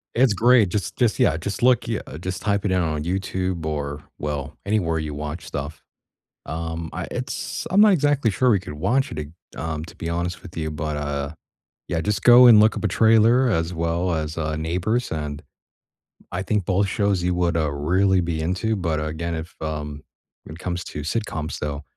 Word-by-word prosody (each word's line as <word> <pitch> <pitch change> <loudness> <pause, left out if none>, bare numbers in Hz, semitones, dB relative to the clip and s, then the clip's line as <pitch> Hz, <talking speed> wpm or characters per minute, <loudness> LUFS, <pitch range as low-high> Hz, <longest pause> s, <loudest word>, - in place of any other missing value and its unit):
It's 125 -3 +4
great, 115 -1 +5
just 95 -2 -3
just 120 -5 +2
yeah, 75 - +3
just 100 +8 -4
look 125 -2 +4
yeah, 115 -3 -1 0.2
just 95 0 -4
type 100 -1 0
it 95 - +1
in 95 - +2
on 75 -2 -1
YouTube 90 -1 -2
or, 75 -1 -3 0.2
well, 75 -1 -4
anywhere 90 -6 +1
you 75 -1 -4
watch 75 +3 -5
stuff. 70 +2 -5 0.7
Um, 80 0 -4
I 90 +1 -4
it's 125 +1 -4
I'm 190 +4 +3
not 210 -2 +7
exactly 145 - +2
sure 125 +6 +2
we 105 - +4
could 90 -5 -8
watch 125 - 0
it 75 - -5
a 80 +3 -13
um, 80 -1 -3
to - - -13
be 85 - -5
honest 85 +1 -2
with 90 - -12
you, 80 -1 -2
but, 75 0 -3
uh, 70 -1 -2 0.6
yeah, 85 - -1
just 100 +4 -1
go 120 +2 +8
and 115 -3 +9
look 110 0 +4
up - - -5
a - - +3
trailer 115 +5 +4
as 85 -4 0
well 85 +2 0
as, 80 0 -3
uh, 80 -1 -1
Neighbors, 90 +10 -1
and 75 -2 -4 0.9
I 90 - -2
think 100 -2 -1
both 100 +1 +2
shows 100 -1 0
you 90 0 +1
would, 85 -2 +1
uh, 75 -3 0
really 90 +6 +2
be 85 -2 -2
into, 95 +7 0
but, 85 -5 -1
again, 80 +2 -3
if, 80 +2 -6
um 75 -1 -4 0.4
when 75 - -9
it - - -11
comes 90 0 -3
to 75 - -6
sitcoms, 80 -2 -3
though, 75 0 -3
85 Hz, 200 wpm, -23 LUFS, 80-105 Hz, 0.9 s, and